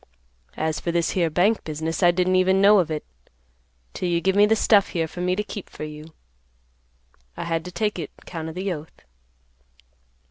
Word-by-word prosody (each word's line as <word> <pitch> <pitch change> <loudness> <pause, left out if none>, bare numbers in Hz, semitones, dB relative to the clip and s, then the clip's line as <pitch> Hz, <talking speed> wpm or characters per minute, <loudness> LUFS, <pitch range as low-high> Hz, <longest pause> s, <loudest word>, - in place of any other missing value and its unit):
As 155 0 -1
for 170 - -2
this 170 -1 0
here 170 -3 +1
bank 185 +8 +2
business, 160 +2 -3
I 175 - +6
didn't 180 +1 +2
even 190 +1 +3
know 200 +1 +6
of 170 -3 0
it, 155 -1 -4 0.9
'till 180 - -2
you 170 -1 +2
give 190 +2 +1
me 205 +1 +6
this 220 0 +2
stuff 205 -3 +4
here 165 -3 -1
for 175 - -8
me 180 0 +1
to 210 - -1
keep 210 -2 -8
for - - -9
you. 150 0 -8 1.3
I - - -3
had 165 -1 -2
to 180 - -7
take 210 0 -1
it 155 - -5 0.2
'count 160 -2 -6
of 160 - -9
the 190 0 -2
oath. 155 0 -11
175 Hz, 200 wpm, -23 LUFS, 160-195 Hz, 1.3 s, I